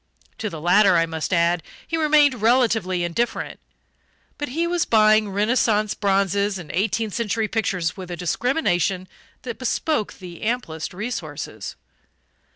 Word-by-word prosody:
To 215 - -2
the 165 - -7
latter, 180 +3 +5
I 165 - +3
must 160 -1 -4
add, 170 -1 +2 0.3
he 330 - -2
remained 295 -6 +4
relatively 225 -6 +2
indifferent; 175 +8 -2 0.8
but 290 - -3
he 325 +7 -1
was 345 -1 +1
buying 215 -1 +4
Renaissance 215 +1 +1
bronzes 200 0 +1
and 175 -5 -8
eighteenth 215 +3 -1
century 225 -1 -1
pictures 180 -7 -1
with 185 -2 -8
a 175 - -5
discrimination 185 - 0 0.4
that 240 -3 -6
bespoke 255 -1 -1
the 175 -3 -11
amplest 215 -9 -2
resources. 180 - -5
210 Hz, 135 wpm, -23 LUFS, 180-235 Hz, 0.8 s, latter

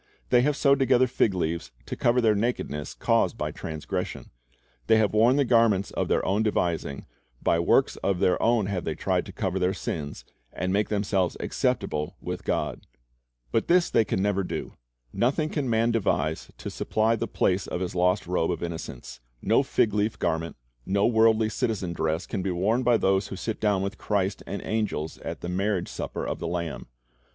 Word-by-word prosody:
They 125 -1 +6
have 145 +2 +1
sewed 140 -1 +4
together 130 -1 +4
fig 115 -5 +1
leaves 85 -1 -2 0.2
to - - -5
cover 120 +1 +2
the 110 -2 +4
nakedness 100 - -2
caused - - +1
by - - -2
transgression. 80 -1 -5 0.6
They 110 - +6
have 110 -2 +2
worn 115 +4 +5
the 140 -1 +3
garments 115 -5 +3
of - - -1
their - - +1
own 100 +3 +1
devising, 85 -9 -1 0.4
by 85 - +3
works 85 - +3
of 100 -2 0
their 90 - +2
own 115 -2 +3
they 100 - -3
have 90 -3 -2
tried - - 0
to - - -7
cover 95 0 -2
their 90 +1 +1
sins, 75 -2 -5 0.3
and 90 +2 -2
make 105 +1 +1
themselves 100 -3 0
acceptable 75 0 -1
with - - -5
God. - - -2 0.6
But 115 - +1
this 175 0 +3
they - - +4
can 95 -3 -1
never 100 -1 +1
do. - - -5 0.4
Nothing 150 +6 +1
can 145 -5 -2
man 115 +1 +2
devise 95 -8 0
to - - -6
supply 110 +1 +1
the 115 +1 -3
place 95 -2 0
of 90 - -3
his 90 - -3
lost 90 +2 +2
robe 90 -2 0
of - - -2
innocence. 80 -7 -6 0.2
No - - +3
fig 105 - +1
leaf 105 +1 0
garment, 80 -1 -1 0.3
no 100 +8 +1
worldly 110 -1 +4
citizen 110 -6 -2
dress, 80 +1 -1
can 100 - -3
be 95 - -2
worn 100 +8 +1
by 120 -2 +4
those 95 -1 +2
who - - -6
sit 110 +3 -4
down 100 -3 +2
with 100 +2 -4
Christ 100 -2 -1
and 100 -1 -4
angels 105 -8 -2
at - - -6
the 85 - -4
marriage 95 0 -1
supper - - -4
of - - -3
the - - -3
Lamb. 85 -2 -4
100 Hz, 190 wpm, -26 LUFS, 90-115 Hz, 0.6 s, They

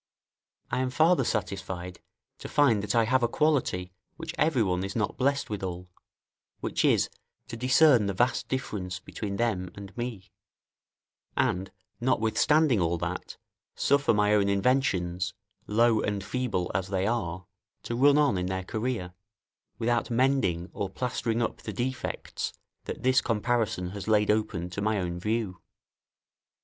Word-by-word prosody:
I - - 0
am 130 0 0
farther 160 +7 +4
satisfied 95 -4 -3 0.4
to - - -7
find 130 -8 +4
that 105 - -2
I 115 - +5
have 130 +3 +2
a 120 - +3
quality, 120 -11 0 0.2
which 165 0 -6
every 150 -6 +2
one 90 -2 0
is 95 0 -4
not 110 -3 -1
blessed 140 -2 0
withal, 90 -3 -5 0.7
which - - -1
is, - - +4 0.4
to 120 - -5
discern 125 -1 +5
the 100 - -2
vast 120 +5 +1
difference 105 -9 -3
between 100 -2 -5
them 100 -5 0
and 100 -1 -10
me; 115 -6 -5 1.1
and 95 +1 0 0.3
notwithstanding 130 - +3
all 85 0 +1
that, - - -5 0.4
suffer 140 0 +3
my 105 -1 +3
own 100 -1 +3
inventions, 100 -5 +1 0.3
low 115 +1 +3
and 105 -2 -2
feeble 115 -7 -2
as 95 +1 -1
they 95 -1 0
are, 95 -6 -2 0.4
to 120 - -3
run 140 +4 +5
on 145 -11 +3
in 90 - -2
their 95 0 -2
career, 110 -3 -3 0.6
without 120 +1 0
mending 120 -9 +1
or 100 - -3
plastering 120 +1 -1
up - - -2
the 110 - -6
defects 125 +5 -3 0.3
that - - -6
this 130 0 +4
comparison 115 -5 0
has 100 -1 -7
laid 105 -1 +4
open 105 -5 -1
to 100 - -4
my 105 0 +1
own 90 -1 -3
view. 105 -2 -2
110 Hz, 150 wpm, -28 LUFS, 95-125 Hz, 1.1 s, I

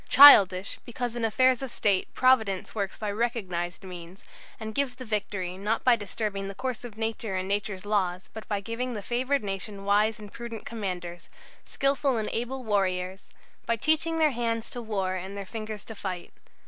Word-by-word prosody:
Childish, 200 -9 +8
because 240 -1 -4
in 240 - -3
affairs 255 +3 +3
of 270 - -4
State 200 -5 +1
Providence 220 -7 +3
works 200 -3 -3
by 210 -2 -2
recognized 200 -7 -2
means, 180 0 -10 0.3
and 220 -1 -5
gives 270 0 0
the 255 - -8
victory, 200 -4 -3
not 210 +3 0
by 250 -2 +6
disturbing 205 -2 -3
the 195 - -6
course 255 +3 -3
of 230 -3 -9
nature 225 -2 -2
and 185 0 -2
nature's 200 -1 -2
laws, 190 -3 0
but 220 - -8
by 205 -2 -1
giving 235 +4 -3
the 210 -3 -5
favoured 255 +3 0
nation 195 0 -5
wise 210 +2 +3
and 210 -2 -11
prudent 235 -2 -7
commanders, 180 -6 -5 0.4
skilful 275 -2 +1
and 215 -1 -1
able 255 +3 -3
warriors; 190 -3 -1 0.4
by 230 - +3
teaching 315 +6 +2
their 310 -2 +4
hands 230 -2 -2
to 245 - -5
war 195 -5 -1
and 190 +2 -5
their 200 - -5
fingers 215 0 -6
to 225 - -7
fight. 185 -4 -6
215 Hz, 180 wpm, -27 LUFS, 195-240 Hz, 0.4 s, Childish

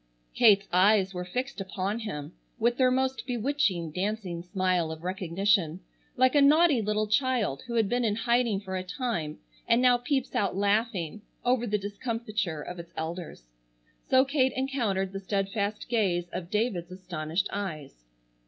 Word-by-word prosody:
Kate's 205 -4 +5
eyes 190 +1 +4
were 180 0 -4
fixed 250 +5 -4
upon 195 +2 -3
him 165 -8 -6 0.2
with 235 +1 +2
their 255 -1 +4
most 265 +1 0
bewitching, 230 - 0
dancing 185 -1 -3
smile 180 -2 0
of 160 +1 -8
recognition, 185 -1 +1 0.4
like 255 0 +4
a 290 - +5
naughty 295 -2 +5
little 210 0 0
child 225 - +1
who 235 - -4
had 225 -3 +3
been 245 +3 0
in 215 -3 +1
hiding 235 -2 +1
for 190 -2 -6
a 185 - -1
time 180 - -3 0.3
and 230 0 +4
now 250 -1 +5
peeps 265 +1 -1
out 200 -3 0
laughing 205 -3 0 0.2
over 245 -1 +2
the 210 0 +1
discomfiture 205 - -3
of 180 0 -7
its 170 0 -10
elders. 165 - -5 0.7
So 260 +1 +5
Kate 265 -2 +2
encountered 230 -8 -1
the 195 - -3
steadfast 200 +2 -2
gaze 190 -7 +1
of 175 -1 -5
David's 210 -5 -1
astonished 175 -2 -3
eyes. 155 - -5
205 Hz, 155 wpm, -28 LUFS, 180-240 Hz, 0.7 s, Kate's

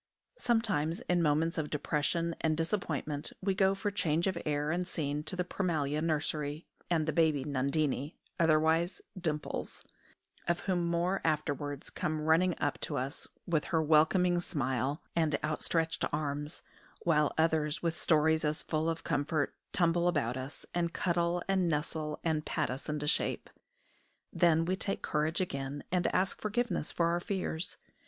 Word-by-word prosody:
Sometimes 210 -10 +1
in 175 -1 +1
moments 160 +2 +2
of 150 - -2
depression 160 +3 0
and 155 -1 +1
disappointment 160 -4 -2
we 195 0 +1
go 190 0 +3
for 205 +1 -2
change 170 -4 +1
of 190 -2 +1
air 150 0 0
and 175 +1 -1
scene 150 -4 -2
to 170 - -2
the 180 - 0
Prémalia 155 -5 -1
nursery; 155 -1 -1 0.2
and 165 -3 +2
the 155 - -1
baby 155 -5 +3
Nundinie, 140 +1 0 0.2
otherwise 165 - +3
Dimples, 160 -5 -3 0.6
of 170 0 +1
whom 175 -3 0
more 175 +3 +1
afterwards, 145 -2 -1
comes 155 0 -2
running 165 +3 +4
up 145 -1 0
to - - -2
us 135 +3 -3 0.2
with 160 -4 +1
her 165 - +1
welcoming 175 +4 +4
smile 135 -2 -1
and 155 -4 +2
outstretched 160 +1 0
arms; 150 +1 -3 0.4
while 150 -3 +3
others, 160 -1 +1
with 165 -1 +1
stories 160 -1 +3
as 150 0 0
full 155 +1 0
of 165 0 -3
comfort, 145 -1 0 0.2
tumble 170 -1 +2
about 125 -9 +1
us, 130 +3 -6
and 170 -1 0
cuddle, 170 0 +1
and 190 -3 +2
nestle, 150 0 -2
and 160 -2 +1
pat 155 -3 -1
us 135 +4 -6
into 150 -1 -2
shape. 150 - -1 0.8
Then 165 -1 +4
we 185 +2 +1
take 195 +1 -2
courage 155 +2 0
again, 140 -5 -3
and 180 -1 +2
ask 190 +1 0
forgiveness 215 -5 -1
for 170 -1 +2
our 170 +1 +1
fears. 180 -3 -3
160 Hz, 155 wpm, -32 LUFS, 150-175 Hz, 0.8 s, running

